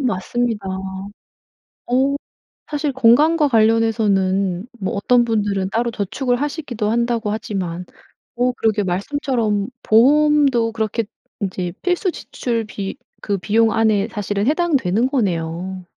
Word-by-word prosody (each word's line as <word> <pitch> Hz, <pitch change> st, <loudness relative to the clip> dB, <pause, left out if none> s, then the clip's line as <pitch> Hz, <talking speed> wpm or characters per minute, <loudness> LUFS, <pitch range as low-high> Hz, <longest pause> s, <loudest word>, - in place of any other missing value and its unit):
맞습니다. 230 Hz, -2 st, -1 dB, 1.0 s
어 265 Hz, +3 st, 0 dB, 0.6 s
사실 295 Hz, -1 st, -1 dB
건강과 290 Hz, +6 st, +4 dB
관련해서는 210 Hz, -5 st, +2 dB
뭐 200 Hz, +2 st, -3 dB
어떤 240 Hz, +4 st, +3 dB
분들은 205 Hz, -4 st, -1 dB
따로 235 Hz, +2 st, 0 dB
저축을 245 Hz, +4 st, -1 dB
하시기도 275 Hz, -7 st, -2 dB
한다고 235 Hz, -2 st, 0 dB
하지만 180 Hz, -5 st, -4 dB, 0.5 s
오 250 Hz, +1 st, +2 dB
그러게 220 Hz, -3 st, +1 dB
말씀처럼 210 Hz, +1 st, -1 dB
보험도 270 Hz, -1 st, +4 dB
그렇게 225 Hz, +1 st, -1 dB, 0.4 s
인제 185 Hz, -3 st, -3 dB
필수 360 Hz, +1 st, +1 dB
지출비 225 Hz, -, -4 dB, 0.2 s
그 200 Hz, -1 st, -1 dB
비용 220 Hz, +4 st, +2 dB
안에 220 Hz, -3 st, +2 dB
사실은 205 Hz, 0 st, -2 dB
해당되는 265 Hz, -, +2 dB
거네요. 185 Hz, -, -2 dB
225 Hz, 270 characters per minute, -20 LUFS, 200-250 Hz, 1.0 s, 건강과